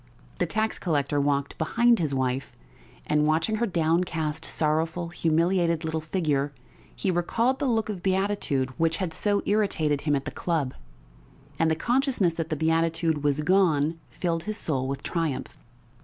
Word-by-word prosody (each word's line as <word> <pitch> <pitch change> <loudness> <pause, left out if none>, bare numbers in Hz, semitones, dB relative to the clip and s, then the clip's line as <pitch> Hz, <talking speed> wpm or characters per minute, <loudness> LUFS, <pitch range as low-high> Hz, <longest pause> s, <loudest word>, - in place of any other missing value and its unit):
The - - +1
tax 220 +1 -1
collector 145 -4 0
walked 140 -1 -1
behind 235 +8 +3
his 155 -4 0
wife, 130 0 -1 0.5
and 150 0 +2
watching 160 +8 +1
her 235 +2 +1
downcast, 160 -3 0
sorrowful, 160 +3 0
humiliated 170 0 +1
little 160 0 -2
figure, 150 -4 -1 0.4
he 190 - 0
recalled 230 +9 +1
the 280 - 0
look 225 -3 +1
of 205 -5 -4
beatitude 190 -9 0
which 165 0 +2
had 185 -5 -3
so 205 +3 +1
irritated 160 -9 +1
him 145 -1 +1
at 135 -1 -2
the 145 - -4
club, 155 -7 -1 0.9
and 165 - +3
the 160 - +2
consciousness 240 - +1
that 165 -1 -4
the 155 - 0
beatitude 160 0 +1
was 145 0 +1
gone 165 -3 +2
filled 165 -2 -2
his 215 0 -3
soul 130 -9 -1
with 135 0 -4
triumph. 165 -6 -3
165 Hz, 155 wpm, -26 LUFS, 150-190 Hz, 0.9 s, behind